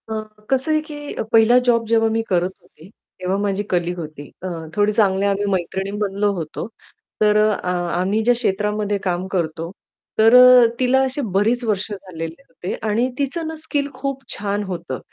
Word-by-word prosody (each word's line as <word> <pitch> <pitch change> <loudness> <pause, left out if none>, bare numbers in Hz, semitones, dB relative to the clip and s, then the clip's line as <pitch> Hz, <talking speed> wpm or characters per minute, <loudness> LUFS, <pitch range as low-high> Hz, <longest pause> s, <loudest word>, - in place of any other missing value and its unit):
अ, 220 0 -2 0.3
कसं 265 +3 +1
आहे, 310 0 +2
की 295 -1 -8 0.2
पहिला 225 +2 +6
जॉब 230 -2 +3
जेव्हा 225 0 +3
मी 225 +1 0
करत 180 0 +1
होते, 160 - -18
तेव्हा 185 -2 -5
माझी 200 0 -1
कलीग 175 0 -1
होती 150 -3 -8
अ, - - -2 0.3
थोडी 205 0 +3
चांगल्या 200 -2 +2
आम्ही 200 +1 0
मैत्रिणी 190 +1 -2
बनलो 205 0 0
होतो 165 -1 -5 0.5
तर 210 0 +4
अ, 215 -1 +3
अ 180 - -2 0.3
आम्ही 195 +4 +1
ज्या 245 +2 +4
क्षेत्रामध्ये 210 -2 -1
काम 180 0 -1
करतो. 165 -3 -3 0.5
तर 225 +2 +6
अ, 250 -1 +9
तिला 260 +1 +3
अशी 265 +2 -2
बरीच 225 +5 +2
वर्ष 210 -2 -1
झालेले 175 -2 -7
होते 250 -8 -6 0.2
आणि 235 +5 +1
तीचं 290 +4 -2
ना 320 - -5
स्किल 290 -2 -2
खूप 270 +1 -4
छान 205 0 -2
होतं 175 -9 -5
210 Hz, 175 wpm, -21 LUFS, 185-245 Hz, 0.5 s, अ